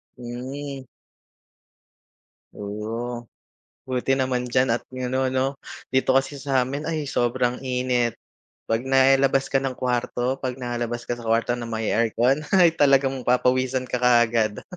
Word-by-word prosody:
Hmm. 130 +3 -7 1.7
Oh, 115 +4 -5 0.6
buti 130 +1 0
naman 130 -2 -1
diyan 130 0 +2
at 115 - -2
ganon 130 +1 -2
'no. 135 +1 0 0.3
Dito 130 0 +2
kasi 135 +1 0
sa'min 135 +1 -1
ay 155 -2 -2
sobrang 125 -2 0
init. 125 -2 0 0.5
'Pag 115 +3 -1
nailabas 135 0 +3
ka 135 - +3
ng 135 -1 -3
kawarto, 125 +1 -1
'pag 130 -2 -3
nalabas 120 -2 -4
ka 120 0 -4
sa 115 - -8
kwarto 115 +1 +2
na 120 - -5
may 110 -1 -2
aircon 115 +4 +2 0.2
ay 175 -3 +6
talagang 135 -3 +3
papawisan 130 +1 +2
ka 125 - -2
kaagad. 120 -3 +2
125 Hz, 130 wpm, -24 LUFS, 120-135 Hz, 1.7 s, ay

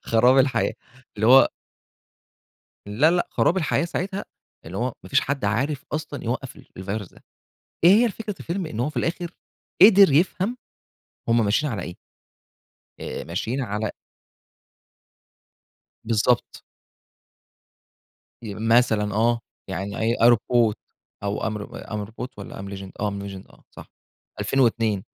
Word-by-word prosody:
خراب 125 +4 +4
الحياة، 130 -3 +2 0.4
اللي 110 +1 +1
هو 130 +2 +8 1.4
لا، 115 +11 +3
لأ، 175 0 0
خراب 180 - +2
الحياة 170 -1 +1
ساعتها، 190 +3 -3 0.4
اللي 90 +4 -7
هو 125 +2 -1
ما - - -11
فيش 140 - +4
حد 140 -4 -3
عارف 130 +8 -1
أصلًا 155 -2 -4
يوقّف 125 +3 -4
ال - - -16
الفيروس 100 +1 -5
ده، - - -20 0.6
إيه 175 - +9
هي - - +3
فكرة 210 0 -6
الفيلم؟ 175 +1 -3
إن 115 -7 -5
هو 140 +5 0
في 150 - -20
الآخر، 170 +6 -2 0.5
قدر 200 -6 +8
يفهم 190 - +1 0.7
هُم 115 -2 +3
ماشيين 140 +8 +1
على 105 - -3
إيه. 90 - -7 1.1
آآ - - -5
ماشين 110 +10 -3
على 105 -3 -2 2.1
بالضبط. 115 +2 +1 1.8
ي 105 -3 -6
مثلًا 110 -2 +2
آه، 115 +2 +2 0.3
يعني 95 +2 -4
I 115 +2 0
I 115 - +8
robot 120 -1 +2 0.5
أو 100 0 -2
am 110 -1 -2
ro 120 +3 -8
am 105 -1 -3
robot 115 +3 -7
والّا 100 - -8
I - - -8
am 100 - -7
legend، 95 -1 -7
آه 105 0 0
I - - -6
am 100 - -5
Legend، 95 -1 -9
آه - - -21
صح، - - -13 0.5
2002 115 -6 +1
115 Hz, 145 wpm, -24 LUFS, 105-145 Hz, 2.1 s, إيه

